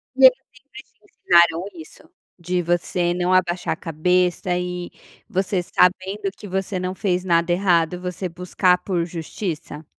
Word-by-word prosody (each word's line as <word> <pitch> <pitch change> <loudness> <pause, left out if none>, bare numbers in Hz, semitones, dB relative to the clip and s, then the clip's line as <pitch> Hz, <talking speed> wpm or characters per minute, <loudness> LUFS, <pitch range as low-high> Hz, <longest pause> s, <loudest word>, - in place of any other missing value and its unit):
E 265 0 +6
eles 255 0 +8 0.2
sempre 280 +7 -14 0.3
ensinaram 170 0 +3
isso? 160 -2 -14 0.3
De 180 +1 -1
você 175 0 0
não 180 +1 0
abaixar 180 -2 +1
a - - -6
cabeça 180 +2 0
e 180 0 -4 0.4
você 190 -2 0
sabendo 190 +3 +1
que 205 - -10
você 190 0 -2
não 185 0 -3
fez 185 -2 -1
nada 170 -1 +2
errado, 175 -2 +2
você 180 +1 -4
buscar 180 +1 +1
por 175 -4 -2
justiça? 165 -2 -6
180 Hz, 145 wpm, -22 LUFS, 175-185 Hz, 0.4 s, eles